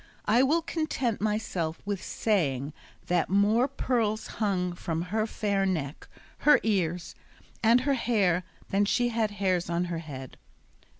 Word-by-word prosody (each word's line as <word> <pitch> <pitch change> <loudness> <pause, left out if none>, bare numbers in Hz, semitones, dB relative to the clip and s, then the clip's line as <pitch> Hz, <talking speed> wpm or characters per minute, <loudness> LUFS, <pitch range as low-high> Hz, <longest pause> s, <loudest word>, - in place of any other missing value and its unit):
I 230 +4 +4
will 310 +5 +3
content 290 -10 -2
myself 205 -7 -1
with 200 -2 -2
saying 145 - 0 0.3
that 175 -1 +1
more 210 +6 +3
pearls 230 -5 -1
hung 185 -4 -1
from 165 -1 -3
her 220 0 +1
fair 200 -3 0
neck, 155 -7 -2 0.3
her 295 - +6
ears, 180 -5 0 0.5
and 235 +2 +5
her 280 +2 +1
hair 200 -8 +2 0.3
than 200 +1 +2
she 240 +4 +2
had 225 -2 0
hairs 185 -4 0
on 170 +1 0
her 165 - -2
head. 135 -5 -8
205 Hz, 140 wpm, -28 LUFS, 175-230 Hz, 0.5 s, her